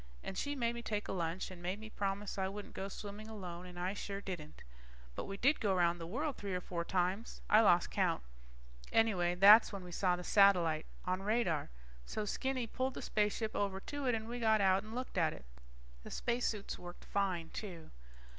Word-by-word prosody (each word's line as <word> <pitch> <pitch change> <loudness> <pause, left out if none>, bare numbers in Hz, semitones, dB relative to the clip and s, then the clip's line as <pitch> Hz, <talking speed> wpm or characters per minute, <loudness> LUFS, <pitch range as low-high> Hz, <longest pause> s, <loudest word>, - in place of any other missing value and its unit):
And 190 - -5
she 285 +8 -2
made 235 -3 0
me 235 - -5
take 210 -3 -2
a - - -3
lunch 175 0 -2
and 180 -2 -10
made 185 +4 -2
me 220 0 -9
promise 200 0 -2
I 190 - +1
wouldn't 205 +1 -7
go 195 - -4
swimming 205 +2 -7
alone, 180 -5 -7
and 175 -1 -9
I 180 +2 -1
sure 200 -1 -4
didn't. 175 -6 -7 0.5
But - - -4
we 195 - -5
did 275 +8 +3
go 200 -3 +2
around 175 -1 +2
the 165 - -6
world 280 - -2
three 200 -2 -3
or - - 0
four 175 -1 -3
times. 185 +5 -1
I 215 - +8
lost 175 -5 +4
count. - - +1 0.7
Anyway 180 -6 +3
that's 205 +5 +8
when 200 -3 -6
we 180 - -9
saw 180 0 +2
the 180 - -7
satellite 175 -6 +4 0.2
on 185 +1 0
radar. 205 -7 +1 0.4
So 215 - -3
Skinny 260 +3 -1
pulled 260 +3 -2
the - - -5
spaceship 215 +1 0
over 195 -1 0
to 285 +6 -4
it 245 - +3
and 220 0 -4
we 240 +1 -4
got 220 -2 +4
out 190 -1 +4
and 215 +3 -9
looked 255 -6 -3
at 160 -2 +2
it. - - -11 0.6
The - - -10
spacesuits 235 -4 -2
worked 175 0 -10
fine, 185 -5 -1
too. 175 -7 -7
195 Hz, 210 wpm, -35 LUFS, 180-220 Hz, 0.7 s, I